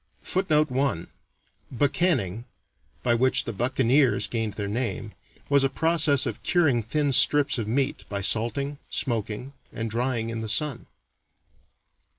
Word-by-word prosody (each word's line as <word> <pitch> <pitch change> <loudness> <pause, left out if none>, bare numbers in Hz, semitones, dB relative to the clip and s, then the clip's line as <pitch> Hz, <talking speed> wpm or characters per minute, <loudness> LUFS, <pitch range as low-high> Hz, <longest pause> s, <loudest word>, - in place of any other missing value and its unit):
[Footnote 155 -6 +1
1: 125 -10 -1 0.6
Buccanning, 130 - 0 0.6
by 120 - +2
which 130 +2 +3
the 115 - -4
"buccaneers" 130 +1 +2
gained 110 -1 -3
their 105 -2 -3
name, 115 -1 -3 0.4
was 140 -1 +3
a 135 - +2
process 155 -1 +2
of - - -4
curing 155 -10 +2
thin 145 +5 -1
strips 145 0 +3
of 110 - -3
meat 130 +4 -1
by 100 -1 -3
salting, 140 +7 +1
smoking, 115 +1 -3 0.2
and 115 -1 -4
drying 115 -1 -1
in 115 -1 -4
the 110 - -5
sun. 145 +1 -1
125 Hz, 135 wpm, -25 LUFS, 115-145 Hz, 0.6 s, which